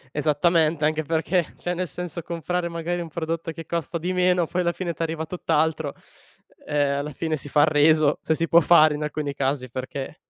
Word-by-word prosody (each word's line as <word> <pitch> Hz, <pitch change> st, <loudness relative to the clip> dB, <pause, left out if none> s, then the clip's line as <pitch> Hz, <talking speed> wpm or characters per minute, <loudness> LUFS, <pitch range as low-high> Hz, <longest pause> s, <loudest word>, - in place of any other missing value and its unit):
Esattamente, 155 Hz, +1 st, +2 dB
anche 155 Hz, 0 st, +1 dB
perché 160 Hz, +1 st, -1 dB, 0.2 s
perché 165 Hz, -, -13 dB
cioè 175 Hz, -, -3 dB
nel 180 Hz, 0 st, -2 dB
senso, 175 Hz, +2 st, -6 dB
perché 170 Hz, +1 st, -7 dB
comprare 175 Hz, +1 st, -2 dB
magari 170 Hz, +1 st, -3 dB
un 170 Hz, -, -5 dB
prodotto 165 Hz, 0 st, -3 dB
che 165 Hz, 0 st, -9 dB
costa 170 Hz, +1 st, -3 dB
di 180 Hz, +3 st, -2 dB
meno 180 Hz, -1 st, +3 dB
poi 180 Hz, +3 st, -2 dB
alla 170 Hz, 0 st, +1 dB
fine 175 Hz, -1 st, -4 dB
ti 165 Hz, -, -9 dB
arriva 160 Hz, -1 st, -2 dB
tutt'altro, 160 Hz, -3 st, -1 dB, 0.7 s
uhm, 145 Hz, -1 st, +1 dB
alla 150 Hz, +1 st, -4 dB
fine 160 Hz, +3 st, -2 dB
si 145 Hz, 0 st, -8 dB
fa 145 Hz, -, +4 dB
il 150 Hz, -, +5 dB
reso, 155 Hz, 0 st, +4 dB
se 160 Hz, -, 0 dB
si 165 Hz, +1 st, -1 dB
può 170 Hz, -, +6 dB
fare 155 Hz, -1 st, +6 dB
in 150 Hz, -, -5 dB
alcuni 150 Hz, -1 st, -3 dB
casi, 135 Hz, -2 st, -2 dB
perché 135 Hz, +3 st, -5 dB
160 Hz, 215 wpm, -24 LUFS, 150-170 Hz, 0.7 s, può